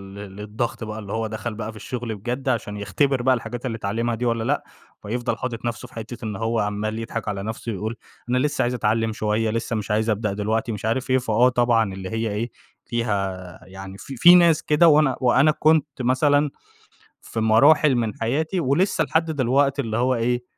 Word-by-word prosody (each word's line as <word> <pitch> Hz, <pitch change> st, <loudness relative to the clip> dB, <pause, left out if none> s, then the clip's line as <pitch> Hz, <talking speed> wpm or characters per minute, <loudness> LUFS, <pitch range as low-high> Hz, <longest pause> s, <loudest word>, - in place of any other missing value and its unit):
للضغط 105 Hz, +4 st, -5 dB
بقى، 110 Hz, 0 st, -5 dB
اللي 100 Hz, -1 st, -7 dB
هو 110 Hz, 0 st, -1 dB
دَخَل 110 Hz, +1 st, -5 dB
بقى 110 Hz, 0 st, -5 dB
في -, -, -16 dB
الشغل 120 Hz, -2 st, -5 dB
بجد 125 Hz, +6 st, -3 dB
عشان 105 Hz, -4 st, -2 dB
يختبر 130 Hz, +6 st, 0 dB
بقى 130 Hz, +1 st, +3 dB
الحاجات 120 Hz, +1 st, -6 dB
التي 115 Hz, -3 st, -2 dB
اتعلّمها 115 Hz, +3 st, -1 dB
دي 120 Hz, +2 st, -3 dB
والّا 115 Hz, -1 st, 0 dB
لأ، -, -, 0 dB, 0.4 s
فيفضل 120 Hz, +4 st, -2 dB
حاطط 120 Hz, -2 st, -5 dB
نفسه 120 Hz, -, -4 dB
في -, -, -22 dB
حتّة 115 Hz, 0 st, -7 dB
إنه 105 Hz, -2 st, -4 dB
هو 115 Hz, 0 st, 0 dB
عَمّال 105 Hz, +2 st, -2 dB
يضحك 115 Hz, -1 st, -5 dB
على 100 Hz, -1 st, -3 dB
نفسه 110 Hz, +1 st, -5 dB
ويقول 110 Hz, +3 st, -4 dB, 0.3 s
أنا 125 Hz, -, +2 dB
لسّه 145 Hz, +3 st, 0 dB
عايز 120 Hz, +1 st, +1 dB
أتعلّم 110 Hz, -1 st, 0 dB
شوية، 110 Hz, 0 st, 0 dB
لسّه 115 Hz, +1 st, -2 dB
مش 105 Hz, 0 st, -3 dB
عايز 110 Hz, +1 st, +1 dB
أبدأ 105 Hz, -1 st, 0 dB
دلوقتي 110 Hz, +3 st, -1 dB
ومش 105 Hz, +1 st, -5 dB
عارف 130 Hz, +3 st, -1 dB
إيه، 130 Hz, -, +4 dB
فهو 125 Hz, 0 st, +3 dB
طبعًا 120 Hz, -5 st, +2 dB
اللي 95 Hz, -1 st, -6 dB
هي 115 Hz, 0 st, -2 dB
إيه، 115 Hz, +4 st, -3 dB, 0.3 s
فيها 100 Hz, -7 st, -3 dB
يعني 95 Hz, +1 st, -10 dB
في 135 Hz, -, -9 dB
في 175 Hz, +7 st, +8 dB
ناس 170 Hz, -3 st, +5 dB
كده. 155 Hz, +3 st, +4 dB
وأنا 150 Hz, -4 st, +4 dB
وأنا 130 Hz, +4 st, +4 dB
كنت 155 Hz, 0 st, +3 dB
مثلًا 145 Hz, +4 st, +3 dB, 0.7 s
في 115 Hz, -, -5 dB
مراحل 140 Hz, +6 st, +5 dB
من 115 Hz, -3 st, -1 dB
حياتي 155 Hz, +10 st, -1 dB
ولسّه 165 Hz, +4 st, +1 dB
لحد 160 Hz, +2 st, 0 dB
دلوقتي 140 Hz, 0 st, +1 dB
اللي 110 Hz, -2 st, -3 dB
هو 125 Hz, +2 st, +2 dB
إيه، 120 Hz, +1 st, 0 dB
115 Hz, 200 wpm, -23 LUFS, 110-130 Hz, 0.7 s, في